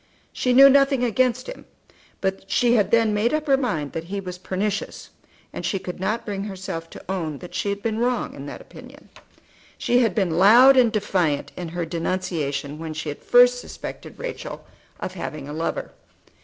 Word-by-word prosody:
She 250 - 0
knew 270 +2 +9
nothing 275 -1 +4
against 250 +1 +1
him; - - -9 0.6
but 195 0 -3
she 240 -1 +3
had 210 -5 +3
then 225 -2 +3
made 225 +7 +1
up 310 0 -2
her 275 -3 +4
mind 160 - -2
that 165 0 -5
he 200 +3 -4
was 180 -2 -7
pernicious, 195 +3 -3 0.4
and - - -6
she 195 - 0
could 180 -1 -7
not 210 +5 -2
bring 200 -1 -4
herself 185 -4 -6
to - - -12
own 165 -6 -3
that 180 - -11
she 205 - -1
had 200 0 -3
been 225 -1 -1
wrong 245 +1 0
in - - -8
that - - -8
opinion. - - -14 0.7
She 245 - +2
had 225 -7 +2
been 180 -5 +1
loud 240 +8 +8
and 245 -3 +5
defiant 180 -9 0
in 175 -2 -5
her 175 0 -3
denunciation 160 -4 -3
when 160 -1 -6
she 155 0 -4
had 145 - -7
first 245 0 +5
suspected - - -9
Rachel - - -6 0.3
of 185 - -5
having 155 -5 -6
a 145 - -6
lover. 165 +2 -3
200 Hz, 190 wpm, -23 LUFS, 170-245 Hz, 0.7 s, knew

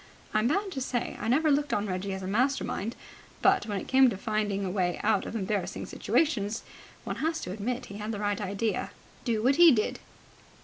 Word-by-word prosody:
I'm 215 +2 +3
bound 390 +8 0
to 270 - -4
say 250 -2 -2
I 215 - -2
never 300 +6 +3
looked 290 0 +2
on 205 - 0
Reggie 190 0 -3
as 190 0 -5
a - - -4
master 255 +8 +1
mind, 225 +5 -3 0.5
but, 385 -6 +4
when 205 -2 -2
it - - -8
came 265 -1 +6
to 200 - -4
find 215 -1 -1
a 195 0 -1
way 180 -2 0
out 210 -2 +2
of - - -6
embarrassing 200 -2 -2
situations, 225 -9 0 0.4
one - - -4
has 320 +1 -1
to - - -5
admit 235 +6 -3
he 200 - -9
had 210 +1 -3
the 215 - -3
right 205 0 -1
idea. 205 +3 -1 0.4
Do 225 -3 0
what 270 +3 +4
he 345 -2 +9
did!" 215 -5 0
220 Hz, 215 wpm, -28 LUFS, 200-265 Hz, 0.5 s, he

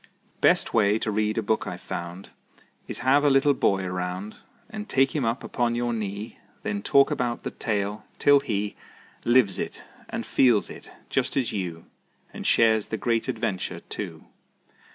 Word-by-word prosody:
Best - - +3
way 105 -2 +4
to 110 - -2
read 110 +1 0
a 115 - +1
book 110 0 0
I've 90 -2 -5
found 85 +2 -7 0.6
Is - - -4
have 140 +2 +5
a 145 - +5
little 140 +1 +4
boy 100 -7 +1
around 90 +2 -4 0.3
And 215 -2 -7
take 135 +2 +3
him 145 - +1
up 115 +3 -1
upon 120 -1 0
your 120 0 0
knee; 105 0 -5 0.2
Then 100 -1 -2
talk 140 +7 +4
about 125 -5 -1
the - - -3
tale, 105 -1 -2
till 145 0 +6
he 105 -6 -2 0.5
Lives 120 -6 +4
it - - -5 0.3
and - - -4
feels 120 -6 +3
it, - - -11 0.2
just - - 0
as 125 -4 +1
you, 85 -5 -4 0.5
And - - -5
shares 110 -2 +4
the 110 - -3
great 115 +1 0
adventure, 95 -2 -2
too. - - -7
110 Hz, 170 wpm, -26 LUFS, 100-125 Hz, 0.6 s, till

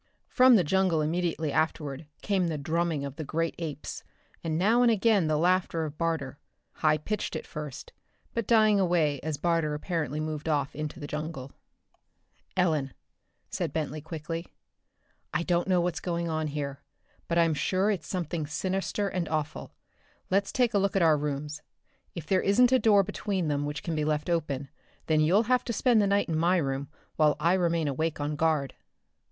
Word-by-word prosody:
From 255 -1 +6
the 190 - +4
jungle 180 -1 +2
immediately 160 -1 -1
afterward 155 -2 -1 0.2
came 190 -4 +1
the 160 -2 -2
drumming 160 0 -1
of 140 +1 -7
the 160 - -4
great 165 +3 -1
apes, 150 -4 -5 0.4
and 160 -2 -1
now 220 +7 +3
and 245 - +5
again 215 -5 +3
the 155 -1 +1
laughter 175 -1 +1
of 150 0 -8
Barter 160 -5 -2 0.4
high 155 -1 +3
pitched 210 +8 -3
at - - -4
first, 150 -4 -8 0.4
but 230 -3 -2
dying 215 -3 +5
away 165 -6 +2
as 155 +1 -3
Barter 165 -1 0
apparently 150 -3 -2
moved 155 0 -3
off 145 -3 0
into 150 0 -5
the 145 - -6
jungle. 150 -3 -5 1.1
"Ellen," 155 -7 +1 0.6
said - - -2
Bentley 155 -1 -3
quickly, 165 +2 -5 0.9
"I 170 - +1
don't 175 0 +1
know 185 -2 +3
what's 175 -1 -1
going 170 -1 -2
on 155 -1 -1
here, 140 -2 -4 0.5
but 170 - 0
I'm 165 -1 +4
sure 185 +8 +1
it's 175 -6 -3
something 170 -4 -3
sinister 190 +5 -2
and 180 -4 -2
awful. 155 -1 -3 0.6
Let's 195 +1 +2
take 245 -2 +1
a 200 - +3
look 195 0 0
at 190 - +3
our 160 -2 +5
rooms. 150 0 -3 0.5
If 170 -4 -6
there 185 +3 +2
isn't 245 +6 +4
a 260 - +5
door 205 -4 +5
between 195 -3 -2
them 145 0 -1
which 145 -1 -5
can 170 - -3
be 155 -1 0
left 150 +2 -1
open, 145 -5 -1 0.4
then 155 -1 +2
you'll 175 +8 +4
have 250 +1 +2
to 235 - -2
spend 230 0 +3
the 200 - +2
night 200 +1 +2
in 165 - -1
my 175 +3 +3
room 135 -3 -2 0.3
while 155 -2 +4
I 170 +2 +3
remain 170 -4 +1
awake 155 +3 -1
on 145 +1 -2
guard." 155 -3 +1
165 Hz, 180 wpm, -28 LUFS, 150-185 Hz, 1.1 s, From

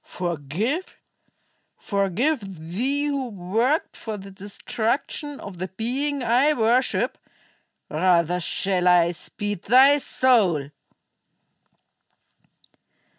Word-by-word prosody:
"Forgive? 180 - -3 0.8
Forgive 205 - 0 0.3
thee, 275 +9 0
who 280 -3 -2
worked 225 - -1
for 220 -2 -6
the 195 0 -10
destruction 230 +8 -3
of 190 -4 -9
the 185 - -3
being 260 +8 -2
I 255 +6 +3
worship? 245 0 +1 0.7
Rather 175 +1 +2
shall 180 +1 0
I 175 -1 +5
speed 205 +2 -5
thy 270 +5 +6
soul!" 195 - +2
215 Hz, 85 wpm, -24 LUFS, 180-265 Hz, 0.8 s, thy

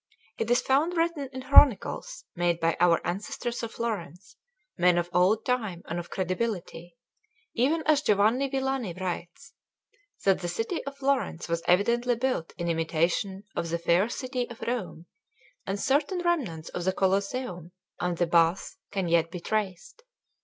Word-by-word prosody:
It 225 - -1
is 245 - +4
found 310 +7 +1
written 330 -5 0
in 260 0 -7
chronicles 280 - +4
made 175 -1 +1
by 165 0 +1
our 170 -2 +5
ancestors 215 +6 -3
of 230 -1 -5
Florence, 205 -4 -5 0.4
men 180 -1 +4
of 175 0 -1
old 190 +5 +3
time 215 -9 -1
and 170 +1 -3
of 175 - -8
credibility, 185 -1 -3 0.6
even 295 +7 +1
as 305 -2 +4
Giovanni 225 +4 +2
Villani 265 -7 -1
writes, 185 +9 -6 0.7
that 195 -1 +4
the 175 - -4
city 225 - -3
of 280 0 -6
Florence 265 -11 -1
was 170 0 -1
evidently 235 +7 +3
built 245 -9 -1
in 170 - -3
imitation 170 +4 0
of 170 -1 -2
the 170 - 0
fair 170 +5 +2
city 255 -1 -3
of 235 - -11
Rome; 210 -8 -4 0.6
and 195 +1 -2
certain 290 - +1
remnants 250 - -1
of 175 - -4
the 190 +1 +1
Colosseum 190 -2 -1 0.3
and 180 -1 -1
the 175 - +2
Baths 170 +1 +2
can 195 -3 -2
yet 165 -1 +2
be 180 - -6
traced. 200 - -3
200 Hz, 155 wpm, -27 LUFS, 175-255 Hz, 0.7 s, our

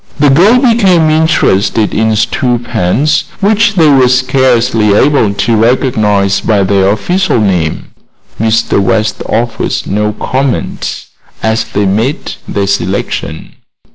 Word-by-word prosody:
The 145 -1 +3
girls 210 - +4
became 190 -10 +3
interested 135 - +1
in 110 0 0
stew 115 +3 0
pans, 120 - -1
which 215 +2 +1
they 165 -4 +3
were 135 -3 +4
scarcely 125 -4 +1
able 135 -4 +2
to 115 +3 0
recognize 110 -4 +1
by 105 -3 +1
their 95 0 +1
official 180 - 0
name. 90 -7 -2 0.5
Mr. 110 -1 +1
West 110 +3 -1
offered 120 0 -2
no 105 +1 -1
comment 130 +3 -3 0.4
as 110 0 0
they 100 0 -2
made 110 +9 -2
their 100 -1 -2
selection. 100 -1 -3
115 Hz, 120 wpm, -10 LUFS, 105-145 Hz, 0.5 s, girls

